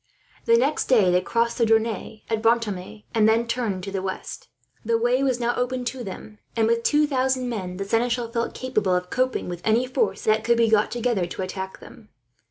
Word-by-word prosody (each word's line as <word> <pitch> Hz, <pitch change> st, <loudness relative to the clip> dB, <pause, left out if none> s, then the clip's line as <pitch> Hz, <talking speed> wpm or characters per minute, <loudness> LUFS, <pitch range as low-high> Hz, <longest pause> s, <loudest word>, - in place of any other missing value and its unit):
The 230 Hz, -, +5 dB
next 275 Hz, +6 st, +1 dB
day 215 Hz, -8 st, +4 dB
they 180 Hz, 0 st, +3 dB
crossed 235 Hz, +4 st, 0 dB
the 230 Hz, -, +4 dB
Dronne 220 Hz, -1 st, 0 dB
at 225 Hz, -1 st, -1 dB
Brantome, 220 Hz, -3 st, 0 dB
and 220 Hz, -1 st, +4 dB
then 230 Hz, +1 st, +2 dB
turned 230 Hz, -6 st, -2 dB
to 195 Hz, -, -5 dB
the 195 Hz, -1 st, -2 dB
west. 190 Hz, 0 st, -6 dB, 0.4 s
The 230 Hz, +1 st, +1 dB
way 245 Hz, +3 st, +2 dB
was 260 Hz, -3 st, +1 dB
now 240 Hz, 0 st, +1 dB
open 250 Hz, 0 st, -2 dB
to 250 Hz, 0 st, -4 dB
them 210 Hz, +1 st, -9 dB, 0.2 s
and, 225 Hz, -1 st, +2 dB
with 230 Hz, +1 st, +2 dB
two 295 Hz, +5 st, +3 dB
thousand 260 Hz, -2 st, 0 dB
men, 185 Hz, -6 st, -4 dB
the 195 Hz, -, -3 dB
seneschal 230 Hz, +2 st, 0 dB
felt 235 Hz, 0 st, -2 dB
capable 215 Hz, -8 st, 0 dB
of 180 Hz, 0 st, -3 dB
coping 255 Hz, 0 st, 0 dB
with 175 Hz, -1 st, -6 dB
any 225 Hz, +3 st, +2 dB
force 260 Hz, -, -1 dB
that 215 Hz, 0 st, +2 dB
could 235 Hz, 0 st, +3 dB
be 230 Hz, -1 st, +3 dB
got 215 Hz, -1 st, +3 dB
together 235 Hz, -6 st, -1 dB
to 190 Hz, -, -5 dB
attack 190 Hz, 0 st, -6 dB
them. 215 Hz, -, -14 dB
230 Hz, 210 wpm, -24 LUFS, 205-245 Hz, 0.4 s, The